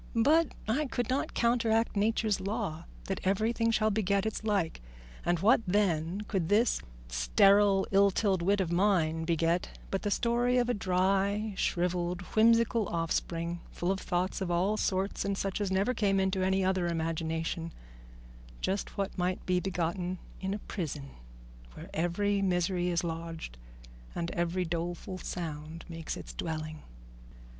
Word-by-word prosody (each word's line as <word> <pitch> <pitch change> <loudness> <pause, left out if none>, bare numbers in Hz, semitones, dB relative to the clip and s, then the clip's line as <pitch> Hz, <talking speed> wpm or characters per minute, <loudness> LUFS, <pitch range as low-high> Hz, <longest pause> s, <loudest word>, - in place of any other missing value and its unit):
But 295 +7 +3
I 275 +7 +1
could 245 -1 -2
not 270 - -1
counteract 230 -2 +2
Nature's 215 0 +1
law 175 -5 -3 0.2
that 195 - -3
everything 220 +4 +1
shall 220 -1 +2
beget 200 -1 +1
its 220 0 -3
like; 200 - 0 0.4
and 175 0 +2
what, 230 +4 +5
then, 180 -2 +1
could 190 -5 -2
this 220 +3 +3 0.3
sterile, 195 - +4
illtilled 195 -1 +3
wit 200 +4 +2
of 175 -3 -2
mine 170 -4 +2
beget 170 +1 0
but 195 - -1
the 205 - -1
story 240 +3 +2
of 245 -1 +2
a - - +3
dry, 195 +2 +1
shrivelled, 175 -1 0
whimsical 230 -1 +4
offspring, 170 +1 -2
full 175 +2 -1
of 195 - -1
thoughts 180 +2 -1
of 190 - -1
all 180 +5 +2
sorts 195 -1 -1
and 200 -1 -1
such 195 +1 -2
as 200 - 0
never 195 +6 +2
came 200 -4 +2
into 190 0 +1
any 190 0 +2
other 185 -2 +1
imagination 165 0 -2 0.9
just 195 +1 -2
what 200 -1 -2
might 180 +1 -1
be 180 0 +2
begotten 180 0 -2 0.2
in 190 +1 -2
a 210 - -9
prison, 145 -6 -4 0.6
where - - -10
every 200 +5 +1
misery 180 -1 +1
is 170 -1 0
lodged 165 - -5 0.6
and 170 0 -2
every 175 +1 -1
doleful 175 +2 -4
sound 160 -2 -6
makes 165 -2 -5
its - - -9
dwelling? 155 -1 -4
190 Hz, 150 wpm, -30 LUFS, 170-205 Hz, 0.9 s, what